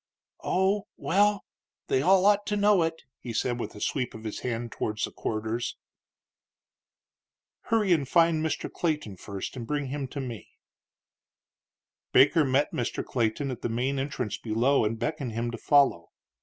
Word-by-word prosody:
"Oh, 190 +2 +1
well, 205 +2 +2 0.4
they 130 - +1
all 185 +4 +4
ought 205 0 +4
to 210 - 0
know 205 -2 +4
it," 165 0 -2 0.2
he 120 - -6
said, 120 +2 -1
with - - -5
a - - -9
sweep 125 +2 -2
of 110 - -9
his 110 -2 -5
hand 120 -1 -3
towards 110 0 -3
the - - -1
corridors. 110 +2 -3 1.9
"Hurry 215 -5 +3
and 140 -5 0
find 165 -2 +4
Mr. 160 - -2
Clayton 150 - -2
first 100 +4 -6
and 120 -3 -6
bring 145 -2 -2
him 140 0 -3
to 140 - -7
me." 120 -5 -6 1.7
Baker 150 +4 +6
met 140 +2 +1
Mr. 120 - -2
Clayton 125 +3 -1
at 125 - -7
the - - -2
main 130 +4 -1
entrance 135 -5 -3
below 115 +3 +2
and 110 +2 -1
beckoned 125 0 -3
him 120 +1 -2
to 115 - -5
follow. 140 -13 +3
135 Hz, 160 wpm, -27 LUFS, 115-160 Hz, 1.9 s, Baker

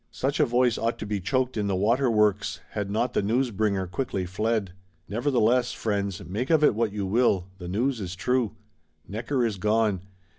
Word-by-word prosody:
Such 140 +4 -2
a 150 - +4
voice 120 0 +2
ought 115 +1 0
to - - -6
be 105 -1 -2
choked 130 +6 0
in 105 -1 0
the 100 - 0
water 120 +7 +2
works;—had 105 -1 0
not 115 +4 0
the - - +2
news 120 +5 +1
bringer 100 -2 0
quickly 95 0 -3
fled. 105 +1 -1 0.4
Nevertheless, 120 +2 +2
friends, 100 -4 -2
make 105 +9 -3
of 160 -2 +4
it 150 - +6
what 110 0 0
you 100 -1 -3
will, 100 -3 +2
the 90 - -7
news 115 +6 0
is 95 -1 -5
true. 125 +2 0 0.5
Necker 120 +5 -1
is 110 -4 -2
gone. 105 -2 +2
110 Hz, 185 wpm, -26 LUFS, 100-125 Hz, 0.5 s, it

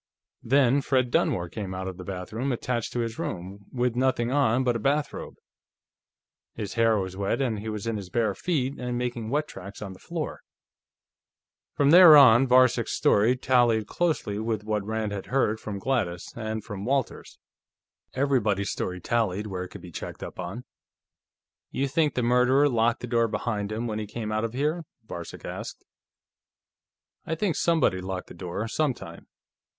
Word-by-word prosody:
Then 135 +2 +3
Fred 130 -2 +1
Dunmore 90 -5 +1
came 95 0 -5
out 95 0 -4
of 95 -1 -6
the 90 - -8
bathroom 100 +8 -4
attached 120 -1 -2
to 120 - 0
his 115 -1 -4
room, 95 +3 -6
with 125 -2 0
nothing 125 -1 +1
on 130 -3 +2
but 120 -2 +1
a - - -1
bathrobe. 145 +6 -1 1.2
His 105 - -5
hair 115 -1 +3
was 95 -1 -3
wet, 100 +5 -1
and 120 -6 0
he 110 +2 -5
was 105 -1 -4
in 115 -1 -1
his 95 -3 -7
bare 110 +1 +1
feet 140 - -2
and 125 -1 -3
making 120 -2 -3
wet 150 +4 0
tracks 100 +2 -10
on 100 -3 -6
the 95 - -15
floor." - - -5 1.3
From 140 0 +3
there 170 -3 +10
on, 130 -1 +7
Varcek's 125 -2 +4
story 110 +5 +4
tallied 120 -4 +3
closely 150 -10 -1
with 110 -1 -2
what 105 -1 -1
Rand 110 0 -2
had 100 -1 -5
heard 120 -5 +1
from 105 -2 -5
Gladys 95 -7 -2
and 110 -2 -4
from 100 -3 -7
Walters. 135 +2 -2 0.8
Everybody's 110 -8 +1
story 90 0 -3
tallied, 105 0 0
where 95 -3 -4
it - - -11
could - - -11
be 90 - -11
checked - - -7
up - - -8
on. 125 - -5 1.1
"You 140 - -1
think 150 +1 +1
the 125 - 0
murderer 125 +4 +4
locked 115 -3 +1
the - - -3
door 115 -1 +2
behind 105 -2 -2
him, 110 +2 -3
when 110 -2 -3
he 105 - -4
came 110 0 -5
out 110 +1 0
of 115 - -5
here?" 150 +6 -1 0.2
Varcek 85 -4 -8
asked. - - -7 1.4
"I 160 - -1
think 180 0 0
somebody 160 - +2
locked 95 0 -5
the - - -9
door, 95 +4 -4
sometime. 145 +2 -3
115 Hz, 175 wpm, -26 LUFS, 100-130 Hz, 1.4 s, there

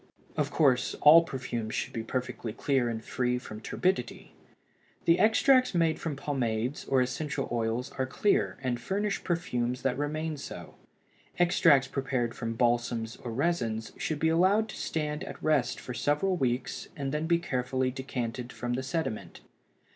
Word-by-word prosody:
Of - - 0
course, 130 -5 +2
all 160 +3 +9
perfumes 125 -7 -4
should - - -3
be 115 - -2
perfectly 125 -1 -4
clear 130 0 +1
and 110 -1 -5
free 125 -1 0
from 110 -3 -8
turbidity. 180 -3 -2 0.7
The 170 +1 +4
extracts 255 +3 +4
made 165 -2 +2
from 160 -4 -3
pomades 130 -2 -2
or 130 -1 +3
essential 135 +2 -3
oils 115 +1 -1
are 130 - +1
clear 200 +9 +1
and 120 -2 -1
furnish 200 - -1
perfumes 125 -8 -1
that 135 -2 +1
remain 155 +1 -2
so; 140 - -8 0.6
extracts 165 -6 +5
prepared 130 -4 -1
from 115 -1 -4
balsams 120 -1 0
or 120 - -6
resins 115 -6 -1
should 155 - -2
be 160 +2 +2
allowed 190 +7 +3
to - - -7
stand 150 -1 -2
at - - -8
rest 145 -6 +2
for 125 - -6
several 150 +10 +1
weeks 130 -5 -1
and 140 -3 -3
then 150 +2 -1
be 170 0 +4
carefully 130 -5 -1
decanted 125 -2 -4
from 120 0 -3
the 130 - -1
sediment. 140 -4 -4
130 Hz, 155 wpm, -29 LUFS, 120-160 Hz, 0.7 s, all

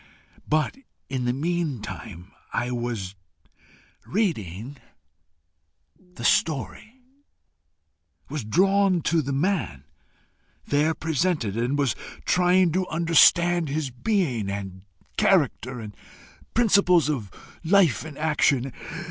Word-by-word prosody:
But 155 - 0 0.3
in 130 -2 -2
the 120 - +2
meantime 125 - -4 0.2
I 125 0 -1
was 120 -6 -3 0.9
reading 135 - -2 1.4
the 120 - -8
story 160 - 0 1.3
was 150 -5 -4
drawn 190 - +2
to 165 0 +2
the 140 -1 -4
man 145 - -1 0.8
there 150 +3 +1
presented 160 - -1
and 120 +5 0
was 140 -5 +1 0.3
trying 180 0 +3
to 185 +2 -1
understand 170 0 +4
his 145 -2 -2
being, 125 - -1
and 95 -2 -6 0.4
character, 125 +2 +1
and 105 -2 -9 0.6
principles 200 -8 +4
of 125 -10 -2 0.3
life 175 - +3
and 155 -3 -9
action. 145 -4 +1
150 Hz, 95 wpm, -25 LUFS, 120-175 Hz, 1.4 s, understand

